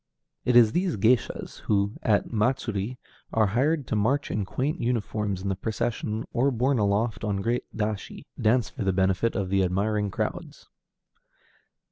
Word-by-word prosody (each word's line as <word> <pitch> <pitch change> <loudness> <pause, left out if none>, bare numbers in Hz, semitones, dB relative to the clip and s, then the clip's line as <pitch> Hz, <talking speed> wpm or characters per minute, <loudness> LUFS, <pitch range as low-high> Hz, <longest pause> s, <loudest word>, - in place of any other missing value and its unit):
It 125 - +2
is 115 -3 +7
these 175 - 0
géishas, 115 +5 +1
too, - - -15
who 100 0 +2
at 105 +2 +1
matsuri 115 -1 0 0.3
are 110 -1 +3
hired 135 +8 +1
to - - -2
march 130 +8 +1
in 105 -2 -1
quaint 130 - -2
uniforms 105 -5 -1
in 100 - -1
the 95 - 0
procession, 110 +1 -2
or, 130 +4 +3
borne 130 +1 +1
aloft 105 +2 0
on 105 -2 0
great 120 +2 0
dashi, 105 -1 -3 0.2
dance 115 +1 +3
for 125 - -5
the 95 -1 +1
benefit 95 +4 +1
of 95 -2 -1
the 95 0 +2
admiring 100 +3 0
crowds. - - -5
110 Hz, 160 wpm, -26 LUFS, 100-125 Hz, 0.3 s, is